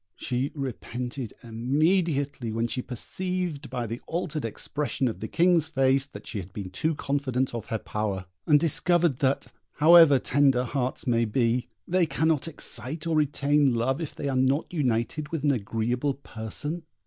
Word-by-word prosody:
She 130 +2 -2
repented 125 -2 -4
immediately 140 - 0
when 115 +1 0
she 125 +2 -2
perceived 170 +3 -3
by 125 -1 -3
the 115 +2 -5
altered 160 -3 -2
expression 135 +4 -2
of 115 - -3
the 110 - -4
King's 170 0 +3
face 135 -2 +2
that - - -11
she 105 - -4
had 95 0 -8
been 95 -2 -6
too 155 - -1
confident 135 -3 -1
of 115 -2 -5
her 115 - -1
power, 105 -3 -3 0.2
and 150 -2 +6
discovered 170 -2 +3
that, 135 0 0 0.2
however 160 -2 +7
tender 135 -1 +3
hearts 130 +4 -2
may 115 -2 +2
be, 120 +2 +1 0.2
they 180 -1 +2
cannot 160 -1 +1
excite 150 0 -5
or 165 -1 0
retain 145 -2 +3
love 130 +6 0
if 160 - -5
they 145 - -4
are 135 - -1
not 130 +6 +1
united 130 0 0
with 160 -3 -3
an 145 - +4
agreeable 120 +4 -1
person. 140 +6 -5
135 Hz, 160 wpm, -27 LUFS, 120-155 Hz, 0.2 s, however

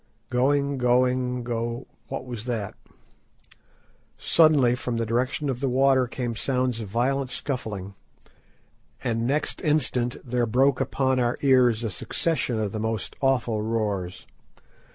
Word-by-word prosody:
Going, 140 +2 +1
going, 125 0 +2
go—What 120 +2 -5
was 120 -3 -6
that? 115 -5 -3 1.4
Suddenly, 150 -7 +4
from 125 -1 -3
the 115 - 0
direction 125 +6 -1
of 130 -3 -2
the 135 0 0
water 130 0 +3
came 120 -1 -3
sounds 125 -1 0
of 110 - -6
violent 130 +5 0
scuffling, 110 -8 -4 1.1
and 115 -1 0
next 145 +3 -1
instant 130 -5 0
there 120 -1 0
broke 130 +4 +3
upon 130 -1 +1
our 120 0 +1
ears 125 -4 +4
a 110 - -2
succession 125 - -1
of 105 -2 -1
the 110 - -4
most 110 0 -3
awful 125 -5 +1
roars. 105 -5 -2
125 Hz, 130 wpm, -25 LUFS, 115-130 Hz, 1.4 s, Suddenly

